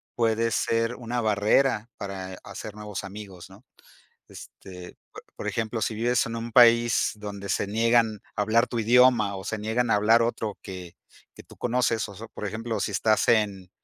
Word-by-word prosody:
puede 115 0 +1
ser 115 +2 0
una 120 0 -4
barrera 110 +2 +2
para 95 -1 -6
hacer 100 +1 -8
nuevos 105 -1 -6
amigos, 95 -2 -10
¿no?, 100 +7 -17 0.6
este, 90 -2 -12 0.2
po - - -10 0.2
por - - -7
ejemplo, 110 0 -2
si 110 - -1
vives 120 +2 +1
en 115 - -5
un 115 0 -6
país 120 0 +5
donde 100 -1 -7
se 100 - 0
niegan 115 0 +2 0.2
a 105 - +1
hablar 115 +3 +3
tu 120 - -4
idioma, 115 -3 +4
o 95 - -8
se 110 - -3
niegan 115 +3 -1
a - - +4
hablar 115 +3 +4
otro 115 -2 -3
que 90 -3 -9 0.4
que - - -12
tú - - -17
conoces, 115 -3 0
o 100 - -10
so 110 +4 -10
por 105 - -7
ejemplo, 110 +2 -4
si 105 - -2
estás 110 +2 +1
en 100 -5 +1
110 Hz, 180 wpm, -26 LUFS, 100-115 Hz, 0.6 s, país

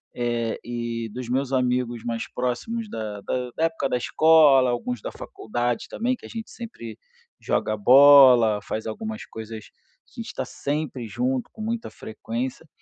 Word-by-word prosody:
eh, 120 -2 -1
e 115 -1 -4
dos 125 -1 -6
meus 130 +1 -1
amigos 125 -2 0
mais 115 -1 -3
próximos, 210 - -3
da 105 - -5
da 125 +3 -3
da 160 - 0
época 165 -4 -1
da - - +1
escola, 145 -1 +5
alguns 120 -1 -3
da - - -5
faculdade 120 +2 -3
também, 250 +3 -1
que - - -15
a - - -10
gente 225 -1 -7
sempre 115 - -9 0.4
joga 110 - 0
bola, 125 -3 +7
faz 110 +1 -5
algumas 220 - -5
coisas 110 -1 -8 0.5
que - - -12
a - - -2
gente - - -9
tá - - -3
sempre 140 -4 -4
junto, 250 - -2
com 220 - -10
muita 230 +1 -3
frequência. 120 +7 -6
125 Hz, 165 wpm, -24 LUFS, 115-155 Hz, 0.5 s, bola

